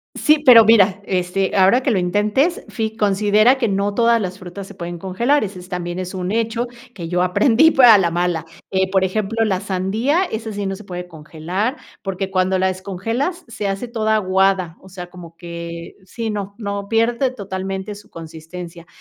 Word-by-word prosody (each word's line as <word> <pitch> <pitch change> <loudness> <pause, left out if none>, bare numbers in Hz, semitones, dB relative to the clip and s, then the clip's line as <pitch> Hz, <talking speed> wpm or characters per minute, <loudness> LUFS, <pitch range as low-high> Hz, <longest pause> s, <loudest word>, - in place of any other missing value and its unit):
Sí, 305 0 +3
pero 235 -5 +8
mira, 205 -3 +5
este, 185 +1 -1
ahora 195 +7 +4
que 260 - +1
lo 200 - +2
intentes, 210 - +1
fi 220 -1 -4
considera 210 +4 +3
que 240 - +1
no 200 0 -1
todas 235 +2 +3
las 190 -2 -5
frutas 185 +1 -8
se 205 - -12
pueden 175 -2 -6
congelar, 225 - +1
ese 195 -3 -6
es 180 +1 -13
también 175 -1 -4
es 185 +1 -5
un 185 0 -3
hecho 230 +2 -1 0.3
que 170 -4 -6
yo 180 +1 0
aprendí 230 - +4
pero 260 -6 +6
a 220 - +9
la 175 -3 +2
mala. 175 -1 -1 0.3
Eh, 190 0 +1
por 190 0 +2
ejemplo, 215 +4 -1
la 190 -4 0
sandía 210 - 0
esa 220 - -4
sí 205 -1 -4
no 195 0 -2
se 210 - -12
puede 180 -1 -6
congelar, 170 - -4 0.2
porque 195 0 -4
cuando 185 0 +1
la 190 0 +2
descongelas 225 - -3
se 210 -3 -4
hace 195 +5 -3
toda 220 -2 0
aguada, 190 -3 +1
o 190 - -15
sea, 180 -1 -8
como 170 -2 -12
que 170 -1 -8
sí, 225 +4 -5
no, 200 -1 -5
no, 200 -2 -5
pierde 235 +3 +1
totalmente 195 -3 -5
su 205 0 -14
consistencia. 165 +1 -10
195 Hz, 195 wpm, -19 LUFS, 180-225 Hz, 0.3 s, a